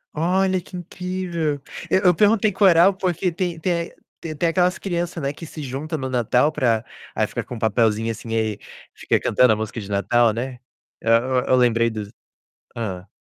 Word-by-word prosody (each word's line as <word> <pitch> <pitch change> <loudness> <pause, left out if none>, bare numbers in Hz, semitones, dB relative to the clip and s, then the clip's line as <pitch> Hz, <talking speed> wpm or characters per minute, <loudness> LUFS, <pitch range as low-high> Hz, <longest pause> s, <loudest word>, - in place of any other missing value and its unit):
Olha, 185 +3 +1
que 180 +1 -10
incrível. 175 -3 -3 0.3
E - - +2
eu 185 -2 +4
perguntei 210 +3 +3
coral, 190 -1 +5
porque 185 -1 -1
tem 170 -1 -3
tem 180 +2 -1 0.2
é - - -22 0.3
t 155 -2 -5
tem 170 +3 0
aquelas 180 +2 +2
criança, 175 -2 -3
né, 140 0 -2
que 165 - -12
se 155 -1 -8
junta 145 +5 -4
no 130 -1 -4
Natal 125 +3 +2
pra 115 -5 +1 0.3
aí - - +2
fica - - -4
com 120 - -8
papelzinho, 110 0 +1
assim, 115 +1 -9
e 110 -2 -1 0.3
fica - - 0
cantando 125 -3 +4
a - - 0
música 110 +1 -5
de 100 - -9
Natal, 110 +4 +2
né, 125 +3 -4 0.5
e - - -10
eu, 125 +3 +3
eu 130 - +4
lembrei 115 -2 +3
dos 105 -2 -6 0.7
hã. 95 -5 -4
140 Hz, 185 wpm, -22 LUFS, 115-180 Hz, 0.7 s, coral